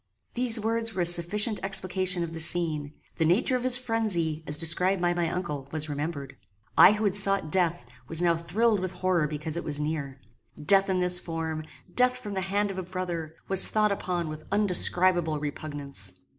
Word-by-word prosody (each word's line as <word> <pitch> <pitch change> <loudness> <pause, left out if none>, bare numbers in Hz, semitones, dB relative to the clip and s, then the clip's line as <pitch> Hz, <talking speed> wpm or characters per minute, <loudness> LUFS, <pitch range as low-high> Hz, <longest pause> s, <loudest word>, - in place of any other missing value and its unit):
These 240 -2 +3
words 225 0 0
were 180 - 0
a - - -1
sufficient 190 +6 +2
explication 185 -2 -1
of 165 -1 -6
the 165 - -6
scene. 155 -3 +1 0.2
The - - +1
nature 185 +10 +1
of 250 - -2
his 255 -1 +3
phrenzy, 205 -10 -1
as 150 - +2
described 180 +4 +2
by 175 0 0
my 175 -1 -1
uncle, 150 -7 -5
was 155 -1 -3
remembered. 145 -1 -5 0.4
I - - +7
who 215 +1 -3
had 200 -3 +1
sought 195 -5 0
death, 175 -1 +1 0.2
was 165 - +1
now 170 -1 +2
thrilled 205 +6 0
with 185 0 -4
horror 180 -3 0
because 150 +2 -4
it 170 - -4
was 145 -1 -1
near. 150 -3 -4 0.4
Death 195 +6 +5
in 185 -1 0
this 180 0 0
form, 160 -2 -5 0.3
death 250 0 +3
from 210 -5 -8
the 190 - -3
hand 200 +2 -1
of 190 - -6
a - - -2
brother, 175 -3 -6
was 190 -1 +8
thought 215 -1 +1
upon 180 -4 -3
with 155 0 -8
undescribable 180 -5 +2
repugnance. 145 -8 -5
175 Hz, 190 wpm, -26 LUFS, 155-195 Hz, 0.4 s, was